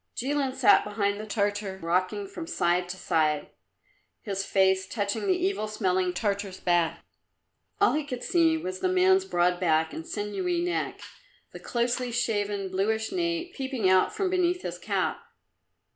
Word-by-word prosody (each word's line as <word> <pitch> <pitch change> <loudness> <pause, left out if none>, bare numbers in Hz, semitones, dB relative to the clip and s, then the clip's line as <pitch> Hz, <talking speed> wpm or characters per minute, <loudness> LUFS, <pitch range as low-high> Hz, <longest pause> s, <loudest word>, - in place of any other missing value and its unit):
Jilin 270 0 -1
sat 245 -6 +5
behind 205 -1 -1
the 215 - -6
Tartar, 205 -2 -1
rocking 185 - -1
from 345 -4 -7
side 180 - +1
to 185 - -5
side, 155 -4 0 0.7
his 195 -2 -2
face 190 -1 +2
touching 205 - -2
the 375 - +4
evil 370 - -1
smelling 185 -4 0
Tartar's 200 0 -2
back. 175 -2 +1 0.7
All 410 - +4
he 305 - 0
could 255 -4 -6
see 330 -2 +3
was 375 +4 -5
the 370 - +1
man's 375 +1 +4
broad 175 - +1
back 160 -3 +2
and 160 - -5
sinewy 340 - -2
neck, 355 0 -2 0.5
the - - -9
closely 245 +1 -1
shaven 205 -4 -1
bluish 220 +4 0
nape 340 0 -2
peeping 265 -7 -1
out 185 0 +4
from 385 -2 -1
beneath 360 -1 +1
his - - -5
cap. - - -1
215 Hz, 155 wpm, -27 LUFS, -, 0.7 s, sat